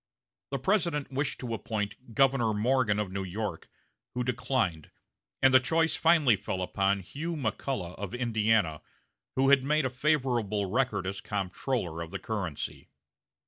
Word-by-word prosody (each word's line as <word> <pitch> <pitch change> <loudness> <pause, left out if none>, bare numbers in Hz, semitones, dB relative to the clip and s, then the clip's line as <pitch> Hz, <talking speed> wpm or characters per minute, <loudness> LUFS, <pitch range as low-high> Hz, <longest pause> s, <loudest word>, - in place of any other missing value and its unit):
The 140 - -1
President 165 -2 0
wished 140 +1 -1
to 120 -3 -3
appoint 110 +2 -4
Governor 130 -5 +3
Morgan 115 -1 +2
of 105 -3 -2
New 95 0 -3
York, 100 +3 -4 0.5
who 125 - 0
declined, 120 - -1 0.5
and 130 0 +6
the 130 - +9
choice 160 +5 +2
finally 160 -8 +5
fell 95 -1 -3
upon 100 +1 +1
Hugh 160 - -5
McCulloch 110 - -2
of 100 +2 -4
Indiana, 110 -9 +1 0.5
who 135 +1 +3
had 140 -2 +6
made 150 +1 +2
a 130 - -1
favorable 125 -7 +1
record 125 -5 +1
as 95 +1 -3
comptroller 95 -2 -2
of 85 - -5
the 100 - -4
currency. 95 -8 -4
120 Hz, 145 wpm, -29 LUFS, 100-135 Hz, 0.5 s, the